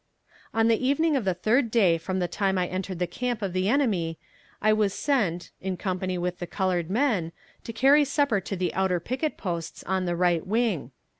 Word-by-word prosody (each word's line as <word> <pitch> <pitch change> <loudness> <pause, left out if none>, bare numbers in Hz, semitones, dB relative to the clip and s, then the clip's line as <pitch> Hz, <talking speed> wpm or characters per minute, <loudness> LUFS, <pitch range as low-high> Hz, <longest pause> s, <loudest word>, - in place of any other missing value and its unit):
On 225 0 +2
the 230 +1 +2
evening 295 +4 +2
of 255 -7 0
the 185 -2 +1
third 230 +7 +2
day 190 -8 +3
from 185 +3 -3
the 180 -1 0
time 190 +2 0
I 180 - +1
entered 185 0 -4
the 180 - 0
camp 235 +5 -3
of 190 -3 -2
the 185 +2 +1
enemy 200 - +1 0.4
I 215 0 +3
was 210 -2 +1
sent, 195 - 0
in 185 -1 -3
company 185 -1 -2
with 180 0 -3
the 175 - -4
colored 180 -2 -1
men, 210 - +1 0.3
to - - -4
carry 275 +6 +5
supper 280 -7 +1
to 195 - -4
the 180 -1 -1
outer 190 -2 +1
picket 260 - -3
posts 170 -4 -5
on 190 0 -1
the 175 -1 -1
right 175 -2 +2
wing. 215 - 0
190 Hz, 205 wpm, -26 LUFS, 180-230 Hz, 0.4 s, carry